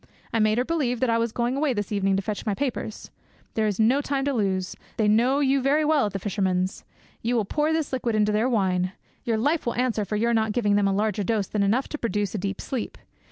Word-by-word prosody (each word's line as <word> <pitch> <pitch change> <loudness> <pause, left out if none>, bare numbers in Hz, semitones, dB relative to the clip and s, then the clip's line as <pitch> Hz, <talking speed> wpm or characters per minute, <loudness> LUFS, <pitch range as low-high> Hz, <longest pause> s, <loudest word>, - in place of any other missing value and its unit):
I 225 - +2
made 215 0 +3
her 250 - +1
believe 270 -7 0
that 255 -1 +2
I 230 - +2
was 230 0 0
going 240 +3 -1
away 280 -1 +1
this 205 -2 -3
evening 195 -1 +1
to 195 - -1
fetch 210 +1 -3
my 210 -3 -1
papers. 255 -5 -4 0.4
There 220 -1 +1
is 205 -1 -2
no 245 +6 +4
time 275 -1 -1
to 285 - 0
lose. 190 -5 -1 0.2
They 215 - +2
know 245 +7 +3
you 275 -1 +2
very 290 +4 +2
well 300 -6 +3
at 205 - -7
the - - -1
fisherman's. 190 -1 -1 0.4
You 240 +2 0
will 220 -3 +1
pour 300 +8 0
this 320 -4 -1
liquid 240 -3 0
into 210 0 +3
their 215 +4 +2
wine; 185 -5 +1 0.3
your 230 -2 +1
life 290 +5 0
will 235 - 0
answer 240 -3 0
for 205 +2 -3
your 235 +3 +1
not 220 -1 +1
giving 210 -4 +1
them 205 -1 +3
a - - +2
larger 210 +2 0
dose 210 0 0
than 210 +2 -2
enough 220 +7 +2
to 300 - -5
produce 205 -3 -1
a 210 - -2
deep 195 +1 -3
sleep. 255 -4 -4
220 Hz, 250 wpm, -25 LUFS, 205-255 Hz, 0.4 s, no